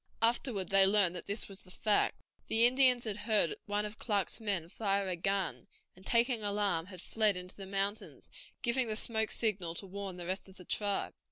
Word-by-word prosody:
Afterward 230 -5 +1
they 195 0 +5
learned 195 -3 +4
that 175 - -8
this 200 +2 -3
was 195 -1 -7
the 185 - -18
fact. 210 +3 0 0.2
The 225 +1 +6
Indians 250 -1 +5
had 210 -3 -2
heard 210 -5 +1
one 205 0 -1
of 210 +1 -7
Clark's 205 -2 -1
men 200 -7 -1
fire 200 +1 -1
a 185 - -1
gun, 195 +1 -2 0.3
and, 185 - -17
taking 235 +2 +2
alarm, 200 -5 0
had 185 -2 -9
fled 215 -4 +2
into 180 +1 -7
the 195 -1 -9
mountains, 200 +2 -3 0.3
giving 245 0 +1
the 215 - -2
smoke 220 0 0
signal 185 -7 -1
to 195 - -4
warn 195 -1 -6
the 175 - -7
rest 190 +2 -4
of 190 - -16
the 180 - -12
tribe. 205 +1 -1
200 Hz, 200 wpm, -32 LUFS, 190-220 Hz, 0.3 s, The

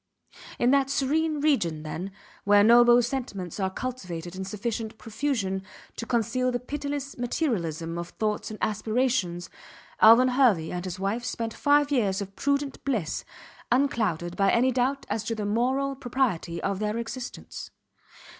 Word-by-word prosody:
In 240 +1 +3
that 275 -1 +3
serene 300 +3 0
region, 175 - +1
then, 170 +5 -5 0.3
where 205 0 +5
noble 240 +2 +7
sentiments 230 - -4
are 190 -1 +1
cultivated 185 -7 -5
in 190 - -4
sufficient 220 +3 -4
profusion 220 -5 -2 0.3
to 230 - -6
conceal 255 +2 +1
the 245 - -1
pitiless 285 +1 -5
materialism 170 - -2
of 170 0 -5
thoughts 210 +1 -2
and 215 - -7
aspirations 215 -4 0 0.5
Alvan 230 +4 +8
Hervey 240 -11 +3
and 180 +1 -4
his 185 0 -5
wife 200 +5 -1
spent 230 -2 -3
five 290 0 +3
years 205 -8 +1
of 195 -1 -6
prudent 280 -1 -1
bliss 225 - -1 0.5
unclouded 215 - +1
by 195 -1 +3
any 255 +2 +3
doubt 260 +2 0
as 220 - -2
to 230 - -2
the 210 -1 -3
moral 260 +6 0
propriety 245 -10 -1
of 195 -1 -1
their 210 +1 -1
existence. 240 +2 -6
230 Hz, 145 wpm, -26 LUFS, 195-260 Hz, 0.5 s, Alvan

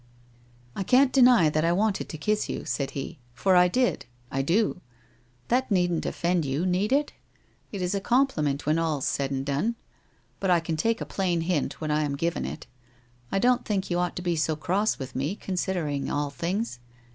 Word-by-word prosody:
' 120 0 -30
I - - -3
can't 255 +7 +4
deny 245 - +6
that 155 +1 +1
I 165 - +3
wanted 205 +3 0
to 155 - -6
kiss 210 +6 0
you/ - - -4
said 140 -1 -2
he, 135 - -6
* 120 - -32
for 190 +8 +3
I 180 0 +6
did; 245 - 0 0.2
I 135 - 0
do. 180 +6 +1 0.7
That 255 +2 +2
needn't 175 -4 +1
offend 175 -1 0
you, 140 +5 -1
need 185 +4 +1
it? 290 +2 +1 0.6
It 195 -3 -4
is 180 +2 -1
a 200 - -1
compliment 195 - +1
when 155 +2 +2
all's 155 -5 -1
said 140 -1 0
and 135 -1 -3
done. 145 +12 0 0.6
But 195 - -1
I 175 -1 +5
can 165 0 -3
take 225 +8 0
a - - -2
plain 180 -4 -1
hint 165 -3 -1
when 155 -1 -2
I 150 +1 +2
am 145 -2 -1
given 170 +4 -1
it. 155 - -6 0.7
I - - +1
don't 250 +4 +3
think 195 -3 -2
you 175 - +1
ought 180 0 -1
to 180 - -5
be 175 -1 0
so 160 0 0
cross 190 +8 0
with 135 -1 -7
me, 140 +9 -1
considering 180 -8 -2
all 145 -1 -1
things. 170 - -3
175 Hz, 205 wpm, -26 LUFS, 150-200 Hz, 0.7 s, deny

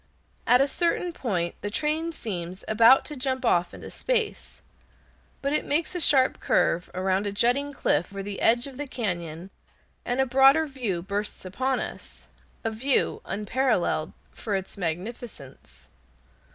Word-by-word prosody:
At 250 +1 +6
a 275 - +3
certain 345 +3 0
point 180 - -2
the 205 - -3
train 310 +7 -1
seems 185 - -5
about 230 +4 +6
to 300 - -6
jump 260 -1 -2
off 175 -6 +2
into - - -10
space, 465 -4 -2 0.8
but 280 +1 0
it 305 - +1
makes 315 +4 0
a 355 - -2
sharp 265 -4 +4
curve 175 +1 +1
around 190 +2 0
a - - -2
jutting 245 +7 +1
cliff 175 - 0
on 195 0 -5
the 200 0 -6
edge 240 +2 +4
of 275 -2 -9
the 290 0 -4
cañon, 175 -7 -4 0.5
and 245 +2 -2
a 265 - +4
broader 270 +5 +5
view 235 - -3
bursts 205 +1 -4
upon 255 +8 -1
us, - - -8 0.4
a 225 - -1
view 260 +5 +1
unparalleled 210 -6 0 0.2
for 210 -3 -3
its 190 0 -4
magnificence. 165 - -7
230 Hz, 150 wpm, -26 LUFS, 185-270 Hz, 0.8 s, At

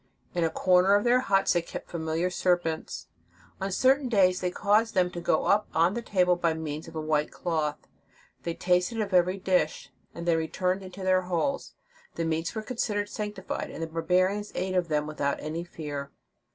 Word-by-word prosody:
In 175 - 0
a 165 - +2
corner 185 +3 +4
of 205 - +2
their 245 +1 +4
huts 195 -6 +2
they 175 - +2
kept 170 - -8
familiar 165 +2 -1
serpents. 175 -3 -1 0.5
On 195 +1 -2
certain 260 +6 +3
days 185 -5 +3
they 180 - 0
caused 210 +4 +2
them 180 -1 +3
to 175 - -6
go - - +1
up 210 +1 +3
on 170 +4 +4
the 235 - -3
table 180 -5 +2
by 170 -2 0
means 155 -1 -5
of - - -11
a - - -2
white 155 -1 +1
table - - -19
cloth: 155 -4 -1 0.5
they 170 -1 -3
tasted 180 +5 +1
of 205 -3 -2
every 180 +1 +3
dish, 185 -1 0 0.2
and 170 +1 -6
then 165 -1 +4
returned 180 +4 -1
into 190 0 -9
their 185 0 +3
holes. 180 - -2 0.4
The 165 - -1
meats 165 +4 -1
were 220 - -3
considered 210 -3 -2
sancti 210 -2 -5
fied, - - -4
and 165 - -6
the - - 0
barbarians 185 +5 0
ate 185 +1 -2
of 180 -2 +1
them 150 -2 0
without 145 -2 -2
any 160 +3 -4
fear. 145 -5 -6
180 Hz, 200 wpm, -28 LUFS, 165-195 Hz, 0.5 s, corner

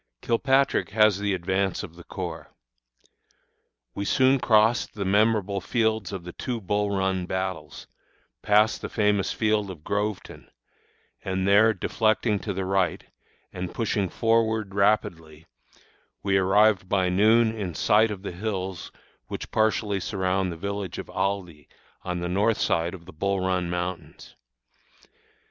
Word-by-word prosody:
Kilpatrick 135 +3 +2
has 105 -2 +3
the 100 -1 0
advance 95 +3 -1
of 85 -5 -9
the 85 - -12
corps. 85 -4 -6 1.4
We 100 - -4
soon 130 +5 +3
crossed 110 0 +2
the 100 -2 -3
memorable 100 0 +2
fields 110 0 0
of 95 -3 -6
the 90 0 -9
two 120 -2 -4
Bull 105 +1 -1
Run 95 -2 -1
battles, 95 -5 -4 0.6
passed 105 +2 +3
the - - -5
famous 105 -2 +1
field 105 -2 0
of 85 -5 -9
Groveton, 105 +1 -4 0.7
and 95 0 -2
there 105 +3 +6
deflecting 110 +1 0
to 105 - -4
the 95 0 -3
right, 95 -1 0 0.5
and 90 -1 -6
pushing 105 -4 -1
forward 110 -2 +1
rapidly, 85 -6 0 0.8
we 100 -1 +1
arrived 95 0 +3
by 95 -2 +2
noon 110 +4 +4
in 95 -6 -5
sight 110 +2 +3
of 100 -2 -6
the - - -4
hills 95 -2 -4 0.4
which - - -7
partially 110 -2 +1
surround 95 -1 -1
the 85 - -7
village 100 0 -4
of - - -7
Aldie, 90 -6 -3 0.3
on 90 -1 -4
the 90 - -2
north 105 +5 +1
side 85 +3 0
of 85 -2 -14
the 95 - -12
Bull 100 +4 -1
Run 90 -1 -1
Mountains. 90 -2 -5
100 Hz, 140 wpm, -25 LUFS, 90-110 Hz, 1.4 s, there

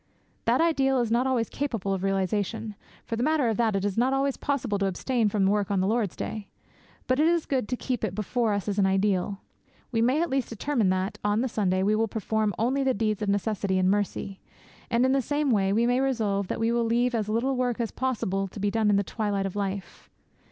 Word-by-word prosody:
That - - +3
ideal 270 -5 +2
is 235 -2 0
not 245 +3 +2
always 240 -4 +1
capable 225 -9 -2
of 190 - -2
realization. 195 +3 -1 0.3
For 230 - -3
the 230 - -3
matter 295 -3 +2
of 220 - -1
that, 225 -3 +2
it 195 0 0
is 205 +2 -1
not 255 +2 +2
always 275 0 +1
possible 255 -8 -1
to 195 - +1
abstain 225 +4 0
from 200 -1 +1
work 200 0 +1
on 200 -2 +1
the 185 - +1
Lord's 215 -2 0
Day. 215 -2 -5 0.6
But 255 +2 +1
it 310 - +4
is 340 -1 +2
good 260 -6 -1
to 250 - 0
keep 250 -2 -3
it 190 -4 -2
before 220 +2 0
us 205 0 -2
as 205 0 -1
an 195 - +4
ideal. 195 0 0 0.5
We 225 -2 +1
may 255 +6 +3
at 340 - -3
least 265 -2 0
determine 230 -2 0
that, 185 +2 -1
on 210 +2 +1
the 260 - 0
Sunday, 190 -5 0
we 210 +2 +2
will 225 +1 +1
perform 215 -1 -1
only 260 +5 +1
deeds 215 0 -1
of 210 - -1
necessity 200 -1 0
and 185 0 +3
mercy. 200 -1 -2 0.5
And, 235 +2 +3
in 260 - +3
the 270 0 +3
same 290 +2 0
way, 195 -3 +2
we 225 +4 +2
may 245 +1 +2
resolve 215 -7 0
that - - -3
we 225 +1 +1
will 235 0 +1
leave 240 +2 +1
as 215 -3 -1
little 240 +5 0
work 250 -2 -1
as 230 -2 -1
possible 195 -7 -1
to 195 - -10
be 205 +1 0
done 220 -1 +2
in 205 - +4
the 200 - +2
twilight 205 -1 -2
of 195 - -4
life. 195 -3 -5
220 Hz, 235 wpm, -26 LUFS, 200-250 Hz, 0.6 s, it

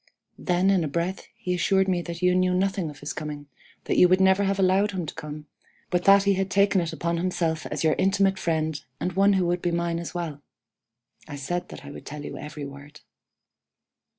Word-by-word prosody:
Then 180 +2 +2
in 185 -3 +2
a - - -1
breath 170 +6 -3
he 180 - -3
assured 190 +2 +2
me 180 -2 +1
that 170 +1 -7
you 180 0 +4
knew 185 0 +2
nothing 190 -2 0
of 145 - -12
his 145 0 -4
coming, 150 -1 -6 0.4
that - - -1
you 180 - +7
would 185 +1 +4
never 190 +1 +4
have 195 0 0
allowed 195 +2 +3
him 180 -3 -3
to - - -6
come, 150 -1 -8 0.5
but 180 -1 0
that 195 0 +7
he 200 0 +3
had 195 0 -1
taken 200 0 +3
it 165 -1 -3
upon 170 +1 -2
himself 170 -2 -1
as - - -3
your 155 -1 +4
intimate 195 0 +2
friend 160 -2 -1 0.2
and 180 - -2
one 200 +2 +4
who 190 -2 +2
would 175 0 0
be 175 - 0
mine 170 0 -1
as 170 +1 -7
well. 160 -5 -4 0.9
(I 145 - -7
said 175 +6 -3
that - - -10
I 140 - -8
would - - -11
tell 145 0 -7
you - - -6
every 150 -1 -7
word.) 145 +2 -12
175 Hz, 220 wpm, -25 LUFS, 155-190 Hz, 0.9 s, you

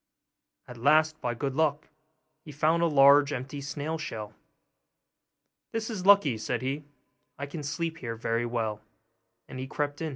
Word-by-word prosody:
At 125 - -10
last, 155 +4 +3
by 120 -1 -2
good 135 +3 -2
luck, 150 0 0 0.6
he 150 - -10
found 155 +4 +2
a 170 - +4
large 140 -1 +6
empty 135 +2 -5
snail 145 +3 -4
shell. 110 -7 -6 1.4
'This 225 +1 -2
is 190 -4 -4
lucky,' 175 - +6
said 120 +3 -2
he, 140 +3 -3 0.5
'I 140 - -4
can 150 +2 -7
sleep 160 +3 -3
here 115 -2 -5
very 115 +1 -1
well'; 110 -3 -2 0.7
and 130 - -8
in - - -3
he - - -10
crept. 145 +1 -3
145 Hz, 160 wpm, -28 LUFS, 125-155 Hz, 1.4 s, large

